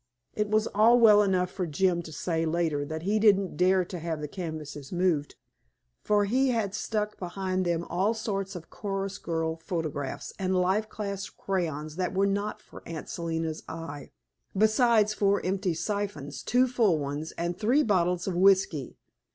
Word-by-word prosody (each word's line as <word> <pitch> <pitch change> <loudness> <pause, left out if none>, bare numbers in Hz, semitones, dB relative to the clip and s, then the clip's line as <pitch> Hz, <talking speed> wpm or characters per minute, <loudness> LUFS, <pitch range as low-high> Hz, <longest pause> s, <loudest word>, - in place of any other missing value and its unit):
It 210 -1 -1
was 215 +1 +2
all 230 +4 +5
well 210 -3 +7
enough 185 -2 +1
for 180 -3 -3
Jim 175 +3 +1
to 165 - -10
say 165 +1 -1
later 160 -3 0
that 155 +2 -5
he 210 +4 +1
didn't 200 -3 +3
dare 185 0 +3
to 180 0 -6
have 165 -1 -3
the 150 - -4
canvases 150 -4 -6
moved, 175 -5 0 0.7
for 205 -1 +2
he 260 +6 +2
had 220 -5 0
stuck 210 0 -2
behind 185 0 -2
them 170 -1 0
all 190 +7 0
sorts 195 -3 -3
of 170 -2 -9
chorus 195 -1 -4
girl 165 -1 -2
photographs 155 -5 -4
and 190 -1 0
life 190 +4 +1
class 200 -2 -4
crayons 155 -5 -3
that 185 0 -1
were 195 +1 +3
not 200 +1 -1
for - - -13
Aunt 165 -2 -6
Selina's 165 -2 -3
eye, 160 -4 -7 0.5
besides 215 0 +4
four 200 -1 +2
empty 185 -2 0
siphons, 195 -7 -3
two 250 +2 +3
full 230 -9 +2
ones, 145 +2 -4
and 170 +1 -2
three 250 +8 +3
bottles 180 -3 +1
of 190 - 0
whisky. 185 -6 +3
185 Hz, 170 wpm, -28 LUFS, 165-205 Hz, 0.7 s, well